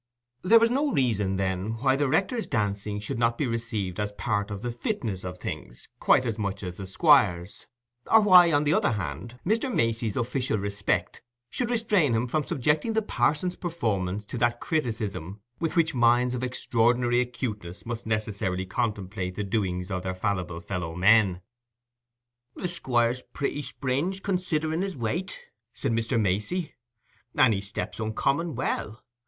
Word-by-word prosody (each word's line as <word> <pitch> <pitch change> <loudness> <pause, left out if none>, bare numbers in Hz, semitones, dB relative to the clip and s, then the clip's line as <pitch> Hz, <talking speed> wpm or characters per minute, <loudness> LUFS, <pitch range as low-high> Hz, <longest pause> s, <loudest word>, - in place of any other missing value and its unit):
There 220 +6 +6
was 230 +1 +4
no 280 +3 +1
reason, 105 - +1
then, 95 +2 -1
why 130 +3 +2
the 145 +1 +1
rector's 220 - 0
dancing 105 -1 -1
should 105 +2 -4
not 115 0 +2
be 145 - 0
received 115 -6 -3
as 105 0 -1
part 105 -1 -1
of 100 +1 -6
the 120 - -2
fitness 115 - -3
of 90 0 -6
things - - -7
quite 130 - +4
as 115 -2 -2
much 100 -1 -3
as 90 -1 -6
the 95 - -6
Squire's, 100 - +3 0.4
or 225 - +8
why, 180 -4 +7
on 145 -1 +3
the 150 +1 +2
other 120 - +2
hand, 115 +4 -5
Mr. 225 +7 +1
Macey's 115 - 0
official 125 -1 0
respect 100 -3 -1 0.3
should 245 -2 -1
restrain 210 - +2
him 115 +2 +1
from 150 +5 0
subjecting 150 - 0
the 220 0 +1
parson's 155 - 0
performance 105 - -2
to 120 - -6
that 120 0 +1
criticism 110 - -3 0.2
with 165 +1 -2
which 165 -2 +3
minds 120 0 +3
of 125 - -3
extraordinary 120 -1 +2
acuteness 105 -7 -5
must 115 -1 -5
necessarily 105 -4 -1
contemplate 95 -2 -3
the 105 - -2
doings 95 -3 -2
of 90 -1 -2
their 95 0 -3
fallible 90 -3 -2
fellow 85 -2 -4
men. 95 -1 +4 1.1
"The - - -3
Squire's 125 -6 0
pretty 145 +1 -2
springe, 140 +6 -2
considering 170 -4 -1
his 195 -4 -3
weight," 165 - -3 0.4
said - - -2
Mr. 115 +1 +1
Macey, 105 - -1 0.6
"and 115 - +5
he 100 - -2
stamps 100 +3 -6
uncommon 135 +8 0
well. 115 -2 -3
115 Hz, 160 wpm, -27 LUFS, 100-145 Hz, 1.1 s, or